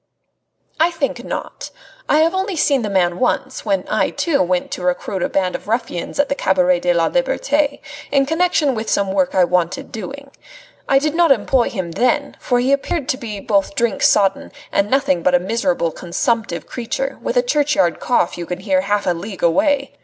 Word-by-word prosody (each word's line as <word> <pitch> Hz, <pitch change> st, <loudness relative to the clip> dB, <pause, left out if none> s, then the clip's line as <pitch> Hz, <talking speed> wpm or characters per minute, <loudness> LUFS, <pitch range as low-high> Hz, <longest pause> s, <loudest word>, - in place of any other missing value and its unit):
"I 325 Hz, +2 st, +4 dB
think 325 Hz, -5 st, -3 dB
not. -, -, -6 dB, 0.4 s
I 305 Hz, -, +4 dB
have 330 Hz, +2 st, +2 dB
only 380 Hz, 0 st, -1 dB
seen 285 Hz, -4 st, +2 dB
the 210 Hz, -, -3 dB
man 180 Hz, -3 st, +1 dB
once, 255 Hz, 0 st, -1 dB
when 195 Hz, -3 st, 0 dB
I, -, -, +1 dB
too, 330 Hz, -5 st, 0 dB
went 180 Hz, 0 st, 0 dB
to -, -, -5 dB
recruit 180 Hz, +1 st, -2 dB
a -, -, 0 dB
band 185 Hz, -2 st, 0 dB
of -, -, -6 dB
ruffians 220 Hz, -6 st, -3 dB
at 285 Hz, -, +3 dB
the -, -, 0 dB
Cabaret 180 Hz, -7 st, +2 dB
de 175 Hz, 0 st, +1 dB
la 170 Hz, -1 st, +2 dB
Liberte, -, -, 0 dB, 0.3 s
in 275 Hz, -1 st, +3 dB
connection 320 Hz, -2 st, +1 dB
with 220 Hz, -1 st, -4 dB
some 195 Hz, -1 st, +1 dB
work 190 Hz, -2 st, 0 dB
I 185 Hz, -, +5 dB
wanted 175 Hz, -1 st, -1 dB
doing. 275 Hz, +5 st, -8 dB, 0.6 s
I 270 Hz, -, +5 dB
did 295 Hz, +2 st, 0 dB
not 335 Hz, -2 st, +3 dB
employ 250 Hz, 0 st, +2 dB
him 185 Hz, -5 st, -4 dB
then, 270 Hz, -, 0 dB
for 245 Hz, -1 st, 0 dB
he 255 Hz, +2 st, +1 dB
appeared 280 Hz, +1 st, -1 dB
to 260 Hz, -, 0 dB
me 215 Hz, -6 st, -6 dB
both 200 Hz, -2 st, 0 dB
drink 230 Hz, 0 st, 0 dB
sodden 195 Hz, -2 st, +2 dB, 0.2 s
and 200 Hz, +1 st, +1 dB
nothing 270 Hz, -8 st, +1 dB
but 180 Hz, +1 st, +3 dB
a -, -, +4 dB
miserable, 230 Hz, -, -1 dB
consumptive 200 Hz, -, -2 dB
creature, 270 Hz, +3 st, -4 dB
with -, -, -2 dB
a -, -, +4 dB
churchyard 295 Hz, -, +1 dB
cough 210 Hz, -8 st, 0 dB
you 170 Hz, -, -5 dB
can 180 Hz, +1 st, -5 dB
hear 190 Hz, -2 st, +1 dB
half 205 Hz, +1 st, -1 dB
a 180 Hz, -, +2 dB
league 190 Hz, +3 st, -7 dB
away. 275 Hz, -, +2 dB
230 Hz, 200 wpm, -19 LUFS, 185-280 Hz, 0.6 s, I